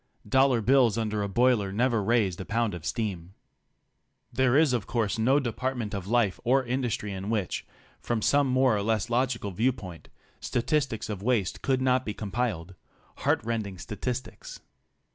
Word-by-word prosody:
Dollar 130 Hz, +1 st, +3 dB
bills 125 Hz, -2 st, +4 dB
under 110 Hz, -2 st, -1 dB
a 100 Hz, -, -2 dB
boiler 115 Hz, -2 st, +2 dB
never 115 Hz, +2 st, +1 dB
raised 100 Hz, -4 st, +1 dB
a -, -, -3 dB
pound 115 Hz, -1 st, 0 dB
of 85 Hz, -1 st, -6 dB
steam. 95 Hz, -6 st, -3 dB, 1.0 s
There 130 Hz, +1 st, +3 dB
is 155 Hz, -4 st, +4 dB
of 115 Hz, -5 st, -1 dB
course 115 Hz, -3 st, -1 dB
no 130 Hz, +6 st, +4 dB
department 120 Hz, -3 st, -3 dB
of 100 Hz, -2 st, -4 dB
life 115 Hz, -4 st, +1 dB
or 130 Hz, +2 st, +2 dB
industry 120 Hz, -5 st, -2 dB
in 95 Hz, +2 st, -5 dB
which, 105 Hz, -5 st, -2 dB, 0.3 s
from 115 Hz, -3 st, -2 dB
some 145 Hz, -1 st, +3 dB
more 130 Hz, -2 st, +3 dB
or 100 Hz, -, 0 dB
less 110 Hz, +2 st, -1 dB
logical 120 Hz, -4 st, 0 dB
viewpoint, 105 Hz, -5 st, -2 dB, 0.3 s
statistics 125 Hz, -2 st, -1 dB
of 105 Hz, -3 st, -5 dB
waste 110 Hz, -5 st, 0 dB
could 130 Hz, -1 st, +1 dB
not 130 Hz, 0 st, +2 dB
be 105 Hz, -4 st, -5 dB
compiled 100 Hz, -5 st, -3 dB, 0.2 s
— -, -, -33 dB
heart -, -, +1 dB
rending 110 Hz, -4 st, -3 dB
statistics. 120 Hz, +7 st, -6 dB
115 Hz, 160 wpm, -27 LUFS, 100-125 Hz, 1.0 s, bills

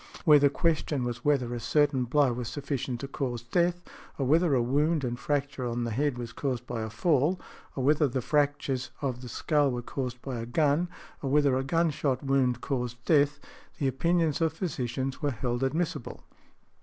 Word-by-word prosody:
Where 150 Hz, -3 st, +8 dB
the 145 Hz, 0 st, +5 dB
question 150 Hz, -3 st, 0 dB
was 120 Hz, -1 st, -4 dB
whether 130 Hz, -5 st, +1 dB
a 120 Hz, -, -3 dB
certain 140 Hz, 0 st, +2 dB
|117| -, -, -18 dB
blow 140 Hz, -2 st, +3 dB
was 120 Hz, -1 st, -4 dB
sufficient 135 Hz, -4 st, -3 dB
to 140 Hz, -, -4 dB
cause 125 Hz, -4 st, -3 dB
death; 175 Hz, +8 st, +1 dB, 0.3 s
or 135 Hz, -, 0 dB
whether 160 Hz, +2 st, +3 dB
a 125 Hz, -, +3 dB
wound 145 Hz, +5 st, +1 dB
and 120 Hz, -1 st, -2 dB
fracture 140 Hz, -3 st, -1 dB
on 120 Hz, 0 st, -2 dB
the 115 Hz, -, -2 dB
head 140 Hz, +3 st, 0 dB
was 120 Hz, -1 st, -6 dB
caused 125 Hz, -4 st, -2 dB
by 120 Hz, -2 st, -4 dB
a 110 Hz, -, -3 dB
fall; 155 Hz, +7 st, +2 dB, 0.4 s
or 130 Hz, -, -2 dB
whether 150 Hz, +2 st, +4 dB
the 130 Hz, 0 st, -2 dB
fractures 145 Hz, -1 st, 0 dB
of 125 Hz, -3 st, -2 dB
the 125 Hz, -, -8 dB
skull 145 Hz, +3 st, +1 dB
were 120 Hz, -1 st, -3 dB
caused 125 Hz, -1 st, -4 dB
by 130 Hz, -4 st, -4 dB
a 115 Hz, -, -5 dB
gun; 150 Hz, +6 st, +2 dB, 0.3 s
or 135 Hz, -, -2 dB
whether 140 Hz, -1 st, +3 dB
a 130 Hz, -, 0 dB
gun 165 Hz, +4 st, +1 dB
shot 135 Hz, -2 st, -1 dB
wound 130 Hz, -3 st, +1 dB
caused 125 Hz, -3 st, -3 dB
death; 145 Hz, -2 st, +3 dB, 0.4 s
the 140 Hz, -, 0 dB
opinions 165 Hz, +4 st, +1 dB
of 160 Hz, -1 st, +2 dB
physicians 135 Hz, -, -3 dB
were 145 Hz, -, +1 dB
held 120 Hz, -1 st, -2 dB
admissible. 155 Hz, 0 st, -2 dB
135 Hz, 195 wpm, -28 LUFS, 125-150 Hz, 0.4 s, Where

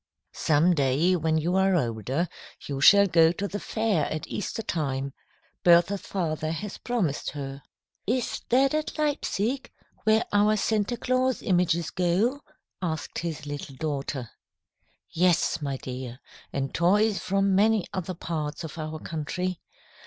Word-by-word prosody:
"Some 160 Hz, +4 st, +3 dB
day, 145 Hz, +5 st, +2 dB
when 160 Hz, -2 st, +1 dB
you 170 Hz, +4 st, 0 dB
are 190 Hz, 0 st, +3 dB
older, 130 Hz, -, -1 dB, 0.4 s
you 140 Hz, -1 st, -4 dB
shall 200 Hz, +7 st, +8 dB
go 165 Hz, -3 st, +5 dB
to 200 Hz, +3 st, -3 dB
the 205 Hz, +1 st, -4 dB
fair 215 Hz, -10 st, 0 dB
at 155 Hz, -, -4 dB
Easter 225 Hz, +2 st, -4 dB
time," 140 Hz, -7 st, -2 dB, 0.5 s
Bertha's 175 Hz, +3 st, +5 dB
father 155 Hz, -4 st, -2 dB
has 195 Hz, +5 st, -5 dB
promised 210 Hz, -, -1 dB
her. 140 Hz, -1 st, -6 dB, 0.5 s
"Is 245 Hz, +3 st, -1 dB
that 265 Hz, +3 st, +4 dB
at 310 Hz, +1 st, -2 dB
Leipsic, 275 Hz, -4 st, -1 dB, 0.3 s
where 220 Hz, +1 st, +3 dB
our 210 Hz, +1 st, +4 dB
Santa 215 Hz, +3 st, 0 dB
Claus 255 Hz, +1 st, 0 dB
images 175 Hz, -3 st, +1 dB
go?" 185 Hz, +10 st, +1 dB, 0.4 s
asked 160 Hz, -3 st, -3 dB
his 160 Hz, -3 st, -4 dB
little 145 Hz, -1 st, -6 dB
daughter. 140 Hz, -4 st, -3 dB, 0.8 s
"Yes, 175 Hz, -1 st, +2 dB
my 140 Hz, -2 st, -2 dB
dear, 125 Hz, -1 st, -7 dB, 0.3 s
and 135 Hz, 0 st, -3 dB
toys 205 Hz, +5 st, +3 dB
from 195 Hz, 0 st, +1 dB
many 210 Hz, 0 st, +3 dB
other 185 Hz, -1 st, -3 dB
parts 155 Hz, -2 st, -4 dB
of 160 Hz, +1 st, -7 dB
our 155 Hz, 0 st, -4 dB
country. 170 Hz, +4 st, -4 dB
175 Hz, 140 wpm, -27 LUFS, 150-205 Hz, 0.8 s, shall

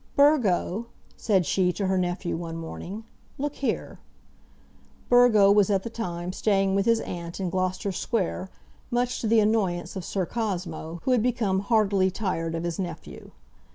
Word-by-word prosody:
"Burgo," 235 Hz, -, +3 dB, 0.3 s
said 195 Hz, -5 st, +1 dB
she 180 Hz, +4 st, +2 dB
to 195 Hz, -, -2 dB
her 190 Hz, 0 st, +1 dB
nephew, 180 Hz, 0 st, -1 dB
one 165 Hz, 0 st, -5 dB
morning, 180 Hz, +6 st, -7 dB, 0.3 s
"look 290 Hz, +1 st, -3 dB
here." 270 Hz, -, -3 dB, 1.1 s
Burgo 240 Hz, -5 st, +6 dB
was 205 Hz, -1 st, +4 dB
at 195 Hz, -2 st, +1 dB
the 230 Hz, -, -6 dB
time 180 Hz, -5 st, -4 dB
staying 195 Hz, -2 st, +1 dB
with 195 Hz, +2 st, +1 dB
his 230 Hz, -1 st, +3 dB
aunt, 170 Hz, 0 st, -6 dB
in 185 Hz, -3 st, -2 dB
Gloucester 185 Hz, +2 st, -1 dB
Square, 190 Hz, -1 st, -2 dB, 0.4 s
much 245 Hz, +1 st, 0 dB
to 225 Hz, -, -1 dB
the 225 Hz, +1 st, +5 dB
annoyance 195 Hz, -6 st, 0 dB
of 190 Hz, -, -4 dB
Sir 190 Hz, +1 st, -2 dB
Cosmo, 175 Hz, -6 st, -4 dB
who 260 Hz, -, +1 dB
had 250 Hz, -3 st, +4 dB
become 220 Hz, -5 st, +1 dB
heartily 200 Hz, -3 st, +2 dB
tired 170 Hz, -4 st, -2 dB
of 165 Hz, -, -3 dB
his 170 Hz, 0 st, -3 dB
nephew. 180 Hz, -3 st, -6 dB
195 Hz, 160 wpm, -26 LUFS, 175-225 Hz, 1.1 s, Burgo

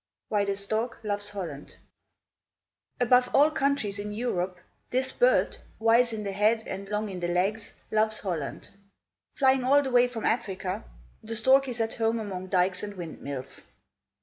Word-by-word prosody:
WHY 205 Hz, -1 st, +2 dB
THE 200 Hz, 0 st, -1 dB
STORK 220 Hz, +4 st, -2 dB
LOVES 205 Hz, -1 st, -2 dB
HOLLAND 170 Hz, -9 st, -7 dB, 1.2 s
Above 250 Hz, 0 st, +4 dB
all 295 Hz, +3 st, +6 dB
countries 275 Hz, -9 st, 0 dB
in 210 Hz, +1 st, -4 dB
Europe, 190 Hz, -5 st, -2 dB, 0.3 s
this 260 Hz, +1 st, 0 dB
bird, -, -, +3 dB, 0.2 s
wise 230 Hz, +2 st, +4 dB
in 215 Hz, -1 st, -4 dB
the 200 Hz, -, -3 dB
head 215 Hz, +3 st, +2 dB
and 195 Hz, 0 st, -6 dB
long 210 Hz, +1 st, -1 dB
in 190 Hz, -3 st, -6 dB
the 175 Hz, -, -2 dB
legs, 195 Hz, +5 st, -1 dB, 0.2 s
loves 215 Hz, 0 st, +2 dB
Holland. 170 Hz, -8 st, -4 dB, 0.6 s
Flying 265 Hz, -2 st, +3 dB
all 285 Hz, +3 st, +5 dB
the 265 Hz, -, -3 dB
way 245 Hz, 0 st, +5 dB
from 235 Hz, -3 st, -5 dB
Africa, 195 Hz, -2 st, -1 dB, 0.4 s
the 225 Hz, 0 st, -5 dB
stork 265 Hz, +4 st, +4 dB
is 245 Hz, -2 st, -5 dB
at 225 Hz, 0 st, 0 dB
home 225 Hz, 0 st, 0 dB
among 190 Hz, -4 st, -5 dB
dykes 180 Hz, 0 st, +2 dB
and 205 Hz, -1 st, -6 dB
windmills. 140 Hz, -6 st, -6 dB
215 Hz, 160 wpm, -27 LUFS, 195-245 Hz, 1.2 s, all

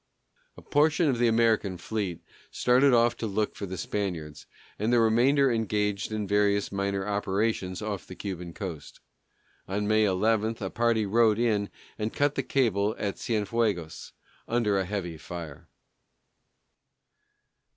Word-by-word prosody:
A -, -, -12 dB
portion 155 Hz, +2 st, +3 dB
of 125 Hz, -3 st, 0 dB
the 120 Hz, -, +4 dB
American 110 Hz, -4 st, +2 dB
fleet 90 Hz, -3 st, -4 dB, 0.3 s
started 130 Hz, +3 st, +3 dB
off 120 Hz, -1 st, +4 dB
to 115 Hz, -, -3 dB
look 105 Hz, +1 st, -1 dB
for 100 Hz, -, -5 dB
the 95 Hz, +1 st, -6 dB
Spaniards, 85 Hz, -5 st, -4 dB, 0.3 s
and 110 Hz, +3 st, 0 dB
the 120 Hz, -, +4 dB
remainder 125 Hz, +5 st, +4 dB
engaged 105 Hz, -2 st, -1 dB
in 110 Hz, -1 st, -2 dB
various 100 Hz, 0 st, +2 dB
minor 100 Hz, 0 st, -2 dB
operations 100 Hz, -1 st, -1 dB
off 105 Hz, -4 st, -4 dB
the 90 Hz, -, -9 dB
Cuban 90 Hz, -4 st, -6 dB
coast. 90 Hz, -8 st, -7 dB, 0.7 s
On 105 Hz, +2 st, -2 dB
May 110 Hz, 0 st, +4 dB
11 110 Hz, +3 st, +1 dB
a 95 Hz, -2 st, -4 dB
party 115 Hz, -2 st, +1 dB
rowed 110 Hz, +1 st, +3 dB
in 110 Hz, -4 st, +1 dB, 0.3 s
and 110 Hz, +1 st, -1 dB
cut 145 Hz, 0 st, +2 dB
the -, -, -1 dB
cables 110 Hz, -5 st, +1 dB
at 100 Hz, -2 st, -3 dB
Cienfuegos, 105 Hz, -6 st, -1 dB, 0.4 s
under 110 Hz, -4 st, +1 dB
a 95 Hz, -, -1 dB
heavy 90 Hz, -4 st, -4 dB
fire. 85 Hz, -4 st, -8 dB
105 Hz, 140 wpm, -27 LUFS, 95-115 Hz, 0.7 s, the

